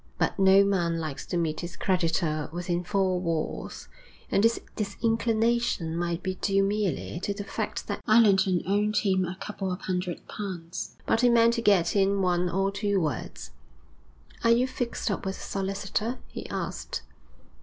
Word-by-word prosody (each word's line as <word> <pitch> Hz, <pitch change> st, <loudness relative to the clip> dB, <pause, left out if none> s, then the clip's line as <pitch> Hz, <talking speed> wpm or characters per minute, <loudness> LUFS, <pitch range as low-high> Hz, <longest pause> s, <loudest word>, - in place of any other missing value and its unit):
But -, -, 0 dB
no 195 Hz, +1 st, +7 dB
man 175 Hz, -4 st, +1 dB
likes 155 Hz, -4 st, -5 dB
to 175 Hz, -, -1 dB
meet 160 Hz, -2 st, -1 dB
his 170 Hz, 0 st, -6 dB
creditor 165 Hz, -4 st, 0 dB
within 175 Hz, +1 st, -2 dB
four 190 Hz, -1 st, +1 dB
walls, 165 Hz, -3 st, -3 dB, 0.4 s
and 200 Hz, -, +3 dB
this 230 Hz, +1 st, +3 dB, 0.2 s
disinclination 225 Hz, -3 st, 0 dB
might 170 Hz, 0 st, -2 dB
be 185 Hz, 0 st, -3 dB
due 195 Hz, -1 st, +3 dB
merely 195 Hz, -6 st, -1 dB
to 200 Hz, +2 st, -2 dB
the 205 Hz, -, -4 dB
fact -, -, -4 dB
that -, -, -4 dB
Allerton 195 Hz, -5 st, +5 dB
owed 205 Hz, +3 st, +1 dB
him 190 Hz, -3 st, +2 dB
a 175 Hz, +1 st, -5 dB
couple 195 Hz, -3 st, -4 dB
of 180 Hz, -, -4 dB
hundred 180 Hz, -2 st, -3 dB
pounds. 180 Hz, -4 st, -6 dB
But 225 Hz, -, +2 dB
he 245 Hz, -, +5 dB
meant 235 Hz, 0 st, +5 dB
to 235 Hz, -, -1 dB
get 200 Hz, -6 st, +3 dB
in 195 Hz, 0 st, +3 dB
one 180 Hz, 0 st, +2 dB
or 195 Hz, +2 st, +1 dB
two 200 Hz, 0 st, 0 dB
words. 150 Hz, -8 st, -4 dB, 0.9 s
'Are 230 Hz, -, +4 dB
you 235 Hz, +2 st, +5 dB
fixed 245 Hz, -3 st, -2 dB
up 195 Hz, -, -3 dB
with 190 Hz, -1 st, -3 dB
a -, -, -12 dB
solicitor?' 195 Hz, +4 st, -2 dB
he -, -, -7 dB
asked. -, -, -4 dB
195 Hz, 165 wpm, -27 LUFS, 175-210 Hz, 0.9 s, no